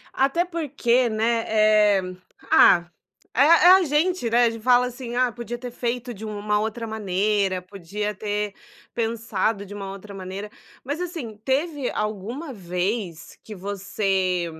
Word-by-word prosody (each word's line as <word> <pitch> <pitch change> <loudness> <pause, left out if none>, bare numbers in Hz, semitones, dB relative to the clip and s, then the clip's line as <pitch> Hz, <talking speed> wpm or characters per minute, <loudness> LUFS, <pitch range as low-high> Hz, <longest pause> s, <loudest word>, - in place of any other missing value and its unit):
Até 275 +7 +2
porque, 275 -8 +1
né, 225 +1 +1
eh, 215 -2 +4 0.5
ah, 175 -1 +6 0.5
é 255 - +2
é 335 +4 +7
a 380 0 +7
gente, 310 -2 +1
né, 240 +2 +4
a - - +3
gente 230 - -8
fala 250 +1 +4
assim 245 -1 -6
"Ah, 250 0 +2
podia 240 0 -6
ter 245 0 -7
feito 245 0 -3
de 215 0 -11
uma 210 -1 -1
outra 225 +2 -3
maneira, 200 -3 0
podia 200 +3 -5
ter 210 0 -3 0.4
pensado 225 -3 -1
de 205 - -10
uma 200 -1 -6
outra 200 +1 -10
maneira", 195 +2 -7 0.3
mas 285 +6 -4
assim 325 - -5
teve 280 +1 -1
alguma 220 - -4
vez 180 -2 -4
que 215 - -9
você, 190 -2 -1
220 Hz, 150 wpm, -24 LUFS, 200-250 Hz, 0.5 s, é